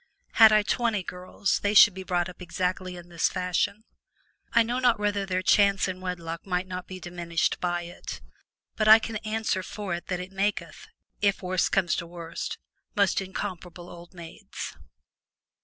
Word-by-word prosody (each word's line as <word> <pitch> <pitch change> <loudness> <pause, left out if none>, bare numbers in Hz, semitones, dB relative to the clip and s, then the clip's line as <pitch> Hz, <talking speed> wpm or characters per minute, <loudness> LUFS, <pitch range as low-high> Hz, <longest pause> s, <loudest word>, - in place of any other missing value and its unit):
Had 220 -1 +8
I 215 -1 +5
twenty 220 -2 0
girls 180 +2 -2
they 205 +1 0
should 205 0 +9
be 190 - -7
brought 180 -1 0
up 180 0 -11
exactly 180 +1 -2
in 175 0 -11
this 170 -2 +1
fashion. 185 +3 -1 0.7
I 230 - +5
know 240 +3 -2
not 245 -3 +3
whether 205 -1 0
their 185 0 -1
chance 200 0 +4
in 185 0 -5
wedlock 170 -2 -5
might 180 -1 -1
not 185 -1 -6
be 185 0 -8
diminished 170 -1 -2
by 175 -1 -1
it, 175 +1 -8 0.6
but 215 - +1
I 220 +1 +11
can 225 0 -4
answer 215 -2 -1
for 195 0 -5
it 175 - -5
that 180 -1 -2
it 180 +1 -7
maketh 205 - -2 0.3
(if 200 -1 +1
worse 185 0 +1
comes 185 -3 +1
to 170 - -4
worst) 170 -1 -6 0.4
most 200 -2 +2
incomparable 180 -2 -6
old 175 +1 -13
maids. 170 -2 -8
185 Hz, 175 wpm, -27 LUFS, 175-205 Hz, 0.7 s, I